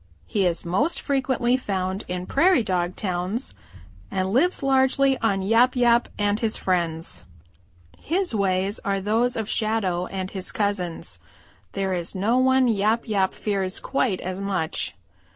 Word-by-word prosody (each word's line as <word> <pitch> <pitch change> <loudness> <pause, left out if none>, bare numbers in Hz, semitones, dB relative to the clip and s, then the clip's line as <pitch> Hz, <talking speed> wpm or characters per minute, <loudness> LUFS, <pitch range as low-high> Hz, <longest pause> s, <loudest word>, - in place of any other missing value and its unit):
He 195 -3 +1
is 170 0 -2
most 255 - +1
frequently 260 -3 +1
found 190 -4 -2
in 180 0 -4
Prairie 315 - +3
dog 180 -2 -1
towns 185 +5 -2 0.6
and 190 +1 -1
lives 325 +6 +2
largely 270 0 +3
on 200 -4 +1
Yap 230 +6 +4
Yap 240 -1 +3
and 205 0 +1
his 225 -2 0
friends. 170 -3 -1 0.7
His 360 -1 -1
ways 195 0 0
are 200 -2 0
those 225 +5 +1
of 220 -2 -3
Shadow 200 -6 0
and 190 -1 -5
his 190 -2 -3
cousins. 200 -5 -2 0.5
There 195 -1 -1
is 175 0 -3
no 220 +7 +2
one 260 0 +4
Yap 220 +1 +1
Yap 195 -3 +1
fears 195 -2 -2
quite 245 -8 0
as 185 +1 -4
much. 190 -5 -2
205 Hz, 145 wpm, -24 LUFS, 185-245 Hz, 0.7 s, Yap